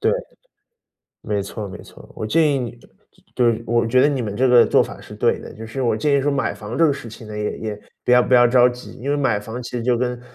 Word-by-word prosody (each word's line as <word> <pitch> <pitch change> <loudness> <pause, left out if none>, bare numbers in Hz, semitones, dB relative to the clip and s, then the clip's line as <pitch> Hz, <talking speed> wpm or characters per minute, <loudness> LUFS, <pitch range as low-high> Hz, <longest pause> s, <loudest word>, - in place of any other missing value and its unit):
对， - - +2 1.1
没 105 -2 -2
错 100 +1 -6
没 - - -9
错。 - - -16
我 110 - -4
建 155 +5 +3
议 135 - +1
你 120 -1 -6 0.6
对， 115 -2 +2
我 120 0 +1
觉 125 +3 +3
得 145 - +5
你 135 -4 -1
们 105 -2 -4
这 130 - +3
个 120 -1 +7
做 - - +4
法 - - -8
是 - - -12
对 - - +1
的。 - - -10
就 110 +1 -9
是 130 +4 -4
我 115 -3 +1
建 140 +5 +2
议 140 - +2
说 145 +2 0
买 140 -1 0
房 110 +2 -7
这 165 - +5
个 145 - +2
事 130 -4 -7
情 110 +1 -11
呢， 105 0 -7
也 105 0 -3
也 105 -2 -6 0.2
不 - - -1
要 125 0 +6
不 130 - +1
要 120 0 +7
着 125 0 +5
急， 125 0 -9
因 140 +3 -3
为 145 - +1
买 125 -7 +1
房 110 +4 -7
其 120 - -8
实 120 -2 -3
就 125 0 +2
跟， 125 0 -2
120 Hz, 295 characters per minute, -21 LUFS, 110-130 Hz, 1.1 s, 个